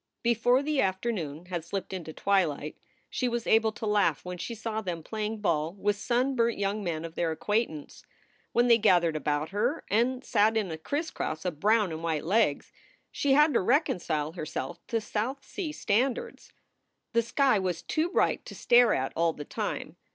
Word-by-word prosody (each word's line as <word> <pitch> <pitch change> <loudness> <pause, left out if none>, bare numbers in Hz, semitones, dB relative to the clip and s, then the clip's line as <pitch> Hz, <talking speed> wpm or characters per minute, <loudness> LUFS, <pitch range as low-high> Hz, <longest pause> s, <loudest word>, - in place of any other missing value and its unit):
Before 245 +3 +3
the 300 -1 +1
afternoon 185 -5 -2
had 175 -2 -4
slipped 190 +3 -5
into 170 -4 -5
twilight 160 -5 0 0.3
she 255 - -1
was 235 -1 -2
able 220 0 +4
to 220 - -6
laugh 210 -3 +1
when 180 0 -6
she 230 +6 -4
saw 220 0 -3
them 175 -5 -4
playing 215 +2 -4
ball 160 -3 0
with 205 +1 0
sunburnt 240 +1 +1
young 200 +1 -1
men 165 -3 -3
of 165 - -8
their 170 -1 0
acquaintance. 160 -2 -2 0.5
When 240 +1 +3
they 235 -1 +6
gathered 175 -6 +4
about 150 0 -1
her 235 +10 -1
and 250 +4 +1
sat 215 +2 +3
in 200 -5 -1
a 160 - -4
crisscross 285 - -3
of 170 -5 -3
brown 210 -1 +3
and 160 0 -5
white 160 -3 -2
legs, 190 -5 +1 0.4
she 280 -1 +1
had 295 +2 +5
to - - +3
reconcile 175 - +1
herself 165 +1 -5
to 230 - 0
South 225 +6 -3
Sea 360 -7 -4
standards. 245 -1 -1 0.6
The 230 - +4
sky 245 -1 +2
was 180 -3 -2
too 320 +2 0
bright - - +1
to - - -8
stare 240 -2 +5
at 130 0 -2
all 165 0 +2
the 145 - -8
time. - - -4
205 Hz, 180 wpm, -28 LUFS, 170-235 Hz, 0.6 s, they